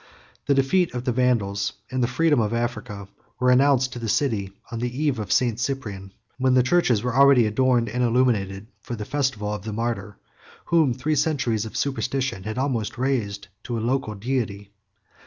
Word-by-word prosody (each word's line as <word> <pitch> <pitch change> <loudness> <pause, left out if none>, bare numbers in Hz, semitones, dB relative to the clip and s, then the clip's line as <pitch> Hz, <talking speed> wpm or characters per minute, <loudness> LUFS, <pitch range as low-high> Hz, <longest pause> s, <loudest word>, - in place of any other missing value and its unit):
The 140 - +3
defeat 140 +4 +2
of 125 - -3
the 125 - +1
Vandals, 110 -5 0 0.2
and 130 0 -1
the 120 - +2
freedom 160 0 +2
of 110 0 0
Africa, 115 -4 -4 0.3
were 125 0 +3
announced 130 0 +3
to 120 - -6
the 115 -2 -4
city 105 -7 0 0.2
on 115 - -4
the 125 +2 -3
eve 145 -6 +1
of 105 -3 -4
St. 120 -3 +2
Cyprian, 110 -8 -4 0.3
when 130 0 +3
the 125 - +5
churches 130 -7 +2
were 125 -1 -2
already 135 -3 +6
adorned 120 +2 +2
and 125 +3 -1
illuminated 115 -5 +1 0.2
for 120 - -5
the 105 -2 -6
festival 130 -8 -1
of 105 - -5
the 110 +3 -6
martyr 115 -2 -3 0.5
whom 160 -6 +3
three 130 +6 -1
centuries 130 -8 0
of 110 - -6
superstition 135 -7 -2
had 110 +1 -4
almost 125 -6 -1
raised 105 -6 -2 0.2
to 120 -1 -3
a - - -1
local 120 -1 -1
deity. 100 -3 -3
120 Hz, 185 wpm, -24 LUFS, 105-130 Hz, 0.5 s, already